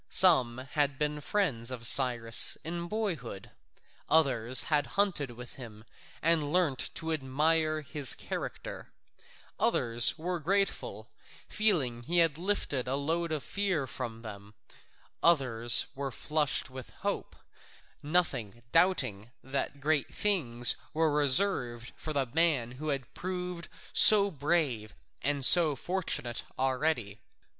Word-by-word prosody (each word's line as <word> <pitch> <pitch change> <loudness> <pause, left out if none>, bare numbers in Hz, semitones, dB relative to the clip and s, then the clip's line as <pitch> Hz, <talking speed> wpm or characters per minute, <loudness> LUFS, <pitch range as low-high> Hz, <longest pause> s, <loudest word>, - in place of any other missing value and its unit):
Some 130 -10 +5
had 145 -2 -1
been 150 0 -3
friends 140 - -1
of 125 -3 -5
Cyrus 120 -3 +5
in 170 +1 -6
boyhood, 170 - -6 0.6
others 130 -6 +3
had 145 -2 -1
hunted 185 -9 0
with 120 0 -12
him 110 -3 -12 0.4
and 155 -3 +1
learnt 165 -7 -1
to 165 -2 -4
admire 155 +3 -1
his 140 -2 +2
character, - - -7 0.7
others 115 +4 +2
were 175 +2 -4
grateful, 195 +5 -3 0.4
feeling 155 - -1
he 170 +8 -3
had 165 -3 +1
lifted 170 -9 -3
a 130 - -2
load 165 +4 -3
of 155 -3 -4
fear 190 -8 -3
from 120 -2 -8
them, 105 -1 -11 0.7
others 125 -8 +3
were 140 0 -5
flushed 150 0 -2
with 130 -1 -10
hope, - - -4 0.7
nothing 135 - -2
doubting 130 - +1
that 135 +1 -4
great 145 0 -1
things 125 - +3 0.2
were 160 -1 +1
reserved 135 - +1
for 155 - -7
the 140 -3 -1
man 145 -3 0
who 140 +5 -9
had 135 -5 -4
proved 180 -2 -6 0.3
so 200 -2 +6
brave 140 - -2 0.3
and 140 -2 +2
so 160 -3 +7
fortunate 160 -8 -3 0.2
already. 130 -5 -2
145 Hz, 120 wpm, -29 LUFS, 120-170 Hz, 0.7 s, so